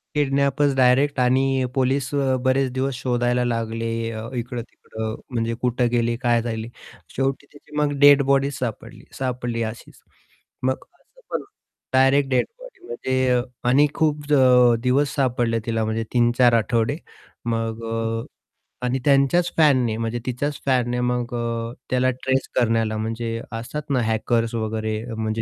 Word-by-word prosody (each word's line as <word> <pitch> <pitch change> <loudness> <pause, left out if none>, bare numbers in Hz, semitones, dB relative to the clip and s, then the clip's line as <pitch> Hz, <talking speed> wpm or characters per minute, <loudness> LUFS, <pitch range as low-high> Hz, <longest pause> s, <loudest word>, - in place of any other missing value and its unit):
किडनॅपचं 140 0 +2
direct 130 +2 +3
आणि 130 +1 +2
police 130 0 +1
अ, 135 -2 +2
बरेच 130 0 +2
दिवस 130 0 -1
शोधायला 125 0 0
लागले 115 -1 -2 0.2
अ, 110 0 -6
इकडं-तिकडं 115 -2 -5 0.2
म्हणजे 115 -1 -1
कुठे 125 0 +1
गेले? 120 0 +1
काय 120 -1 +3
झाले? 115 -1 -4 0.5
शेवटी 135 +1 -1
तिची 145 +1 -15
मग 150 -1 +2
डेड 145 0 +8
बॉडी 140 +1 +2
सापडली, 125 -5 -6 0.2
सापडली 125 -3 -2
अशीच. 110 +1 -8 0.6
मग 130 - +2 0.3
असं - - -25
पण - - -2 0.5
डायरेक्ट 135 +1 +4
डेड 130 - +2
बॉडी - - -14
म्हणजे 130 -1 +1 0.3
आणि 145 +4 +5
खूप 150 -2 0
ज - - +3 0.5
दिवस 140 +3 +1
सापडले 120 -4 +1
तिला 115 -1 0
म्हणजे 110 +1 -1
3-4 120 0 +4
आठवडे. 115 +3 +1 0.5
मग 115 -1 -2
अ, 115 0 -2 0.6
आणि 125 +2 0
त्यांच्याच 145 +5 +3
फॅनने 130 -8 +4
म्हणजे 115 +1 -2
तिच्याच 140 +4 -2
फॅनने. 125 -2 +1
मग 125 0 -1
अ, 115 0 -3 0.2
त्याला 130 0 +2
ट्रेस 130 +1 -1
करण्याला 115 -2 +1
म्हणजे 115 +1 -3
असतात 130 +7 -6
ना 130 -3 +2
हॅकर्स 115 +1 0
वगैरे 110 -1 -2
अ, 120 -1 -7
म्हणजे 110 0 -2
125 Hz, 140 wpm, -23 LUFS, 115-135 Hz, 0.6 s, डेड